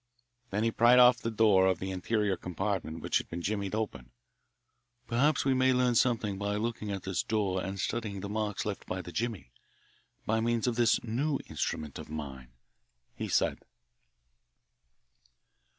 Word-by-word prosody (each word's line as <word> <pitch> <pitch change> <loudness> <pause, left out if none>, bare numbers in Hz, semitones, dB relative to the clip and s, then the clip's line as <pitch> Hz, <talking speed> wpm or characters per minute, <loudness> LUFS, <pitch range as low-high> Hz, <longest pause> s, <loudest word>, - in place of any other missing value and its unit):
Then 105 +1 -1
he 115 - +2
pried 120 +2 +5
off 125 0 +7
the 115 - -2
door 105 -4 +4
of 95 -2 +2
the 95 +2 -4
interior 100 +2 0
compartment 90 -2 -3
which - - +1
had - - -9
been 85 +1 -5
jimmied 100 0 -2
open. 70 - -4 1.0
"Perhaps 125 +7 +2
we 135 - +3
may 130 0 +3
learn 125 -1 +2
something 115 -5 +1
by 100 0 -1
looking 110 -1 -3
at 95 -2 -4
this 95 -2 -1
door 100 -4 -1
and 95 +2 -5
studying 105 -2 -2
the 100 - -4
marks 105 -1 -2
left 105 -2 -4
by 90 0 -3
the 85 - -8
jimmy, 110 - -3 0.7
by 110 +1 +1
means 115 0 0
of 120 -2 0
this 120 -1 +3
new 135 +6 0
instrument 75 -3 -4
of - - -9
mine," 70 -5 -7 0.6
he - - -5
said. - - +1
105 Hz, 165 wpm, -30 LUFS, 95-115 Hz, 1.0 s, off